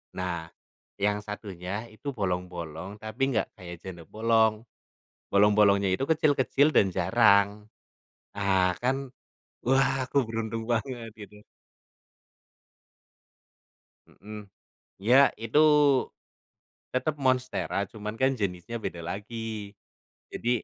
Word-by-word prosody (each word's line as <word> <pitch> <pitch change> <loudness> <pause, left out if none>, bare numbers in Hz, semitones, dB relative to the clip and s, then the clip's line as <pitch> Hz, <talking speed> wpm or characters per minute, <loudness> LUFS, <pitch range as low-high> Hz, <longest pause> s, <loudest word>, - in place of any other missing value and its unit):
Nah, 85 -3 -3 0.5
yang 105 +1 +2
satunya 105 +1 -6
itu 140 +6 -6
bolong-bolong 90 -1 -4
tapi 110 +4 -8
nggak 110 - +1
kayak 85 -1 -8
janda 90 -3 -9
bolong. 110 +1 +2 0.7
Bolong-bolongnya 100 -1 +4
itu 95 - -1
kecil-kecil 150 -1 +3
dan 95 - +4
jarang. 100 +2 +4 0.9
Nah 95 -3 +2
kan 135 +2 0 0.6
wah 135 0 +2
aku 140 - -8
beruntung 115 0 -4
banget, 120 0 -3
gitu. 105 0 -12 2.6
Mhm. 105 0 -11 0.6
Iya, 130 +6 +6
itu 115 +6 +1 1.3
tetap 140 +4 -1
monstera 130 0 0 0.2
cuma 105 -1 -5
kan 135 +1 +3
jenisnya 95 +3 -3
beda 85 - -4
lagi, 110 0 -5 0.6
jadi 120 - -3
105 Hz, 95 wpm, -27 LUFS, 100-120 Hz, 2.6 s, Iya